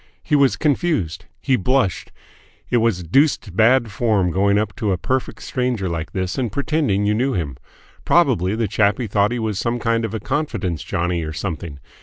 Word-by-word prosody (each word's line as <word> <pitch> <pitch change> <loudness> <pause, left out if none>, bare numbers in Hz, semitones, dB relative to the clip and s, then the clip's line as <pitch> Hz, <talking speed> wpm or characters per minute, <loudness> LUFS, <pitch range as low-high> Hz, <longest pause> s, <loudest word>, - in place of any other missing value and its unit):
He 150 - +1
was 140 -2 +3
confused. 145 - 0
He 130 - +1
blushed. 125 -3 0 0.6
It 120 - +4
was 110 -6 +1
deuced 110 - +1
bad 115 +1 +4
form 100 -4 +1
going 100 +3 +2
up 105 -1 -1
to 110 -4 0
a 95 - +1
perfect 130 +10 -2
stranger 125 -6 -1
like 85 -1 -4
this 95 +4 -2
and 120 -5 -1
pretending 140 -7 0
you 105 - +2
knew 130 +5 0
him. 75 -8 -3 0.5
Probably 120 - +2
the 115 -1 0
chappie 105 +3 +1
thought 105 0 +1
he 125 - -1
was 110 -4 -2
some 120 +1 -1
kind 115 0 0
of 110 0 -3
a - - -2
confidence 115 - -2
johnnie 85 0 -1
or 80 -1 -4
something. 80 -4 -5
110 Hz, 185 wpm, -21 LUFS, 95-125 Hz, 0.6 s, It